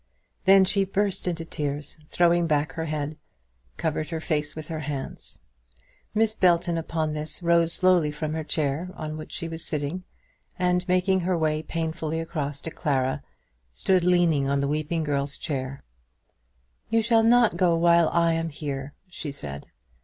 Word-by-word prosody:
Then 195 Hz, 0 st, +7 dB
she 195 Hz, +1 st, +2 dB
burst 195 Hz, 0 st, 0 dB
into 165 Hz, -2 st, -2 dB
tears, 145 Hz, -1 st, -4 dB
and 155 Hz, -, -24 dB
throwing 175 Hz, -1 st, +3 dB
back 150 Hz, -1 st, +1 dB
her 160 Hz, -, -4 dB
head, 150 Hz, -1 st, -3 dB, 0.6 s
covered 155 Hz, -1 st, -2 dB
her 165 Hz, -1 st, -3 dB
face 150 Hz, -2 st, -1 dB
with 155 Hz, -1 st, -7 dB
her 160 Hz, -1 st, -3 dB
hands. 145 Hz, -3 st, -4 dB, 0.8 s
Miss 220 Hz, 0 st, +3 dB
Belton, 175 Hz, -4 st, +3 dB
upon 160 Hz, -1 st, -2 dB
this, 155 Hz, +3 st, -5 dB
rose 170 Hz, -1 st, +4 dB
slowly 185 Hz, -4 st, +4 dB
from 150 Hz, +1 st, -4 dB
the 160 Hz, 0 st, -2 dB
chair 155 Hz, +3 st, -1 dB
on 155 Hz, 0 st, -5 dB
which 155 Hz, -, -8 dB
she 165 Hz, -, -4 dB
was 165 Hz, 0 st, -3 dB
sitting, 155 Hz, +3 st, -3 dB, 0.5 s
and 180 Hz, 0 st, +1 dB
making 185 Hz, +1 st, +3 dB
her 180 Hz, 0 st, 0 dB
way 155 Hz, -1 st, +1 dB
painfully 160 Hz, 0 st, -3 dB
across 150 Hz, -4 st, -4 dB
to 160 Hz, -, -5 dB
Clara, 135 Hz, -6 st, 0 dB, 0.5 s
stood 185 Hz, -, +2 dB
leaning 170 Hz, -6 st, +3 dB
on 140 Hz, 0 st, +1 dB
the 140 Hz, -, 0 dB
weeping 155 Hz, +3 st, -1 dB
girl's 140 Hz, -1 st, -1 dB
chair. 135 Hz, -3 st, -4 dB, 1.1 s
"You 225 Hz, 0 st, +2 dB
shall 225 Hz, 0 st, +4 dB
not 235 Hz, 0 st, +5 dB
go 175 Hz, -3 st, +3 dB
while 170 Hz, -1 st, +5 dB
I 170 Hz, -1 st, +3 dB
am 165 Hz, 0 st, -1 dB
here," 145 Hz, -2 st, -5 dB
she 165 Hz, -4 st, -6 dB
said. 70 Hz, -, -6 dB
160 Hz, 165 wpm, -26 LUFS, 150-175 Hz, 1.1 s, Then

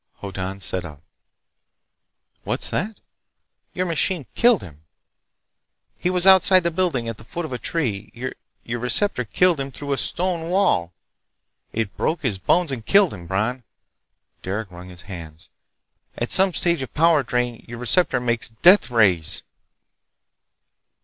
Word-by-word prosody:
Hoddan 95 Hz, 0 st, -5 dB
sat 95 Hz, -1 st, -1 dB
up. 75 Hz, -5 st, -10 dB, 1.4 s
"What's -, -, -2 dB
that?" 210 Hz, +4 st, -2 dB, 0.8 s
"Your 185 Hz, -, 0 dB
machine—killed 185 Hz, -, +2 dB
him. 75 Hz, -4 st, -13 dB, 1.2 s
He 180 Hz, -, 0 dB
was 180 Hz, 0 st, +2 dB
outside 190 Hz, -1 st, +7 dB
the 170 Hz, 0 st, -1 dB
building 160 Hz, -9 st, -1 dB
at 115 Hz, -2 st, -5 dB
the -, -, -12 dB
foot 170 Hz, +9 st, -5 dB
of 150 Hz, -, -6 dB
a 125 Hz, -, -4 dB
tree. 110 Hz, -12 st, -3 dB, 0.5 s
Your 120 Hz, +1 st, -4 dB
receptor 125 Hz, -, +1 dB
killed 175 Hz, +7 st, +2 dB
him 135 Hz, 0 st, -4 dB
through 140 Hz, +2 st, -4 dB
a -, -, -1 dB
stone 170 Hz, 0 st, -2 dB
wall! 180 Hz, -, +2 dB, 0.8 s
It 105 Hz, -4 st, -3 dB
broke 160 Hz, -1 st, -1 dB
his 105 Hz, -8 st, -1 dB
bones 165 Hz, -, +2 dB
and 120 Hz, -4 st, -5 dB
killed 195 Hz, -, +4 dB
him.... 85 Hz, -4 st, -10 dB
Bron—" 110 Hz, +8 st, -1 dB, 0.8 s
Derec 100 Hz, +1 st, -4 dB
wrung 90 Hz, +1 st, -11 dB
his 90 Hz, -1 st, -12 dB
hands. 85 Hz, -5 st, -10 dB, 0.7 s
"At 120 Hz, -, -3 dB
some 190 Hz, -1 st, +4 dB
stage 170 Hz, -4 st, +1 dB
of 130 Hz, -, -7 dB
power 165 Hz, -1 st, +4 dB
drain 125 Hz, -1 st, -2 dB
your 120 Hz, 0 st, -8 dB
receptor 140 Hz, +8 st, +1 dB
makes 120 Hz, -2 st, -1 dB
deathrays!" 110 Hz, -, +4 dB
125 Hz, 140 wpm, -22 LUFS, -, 1.4 s, outside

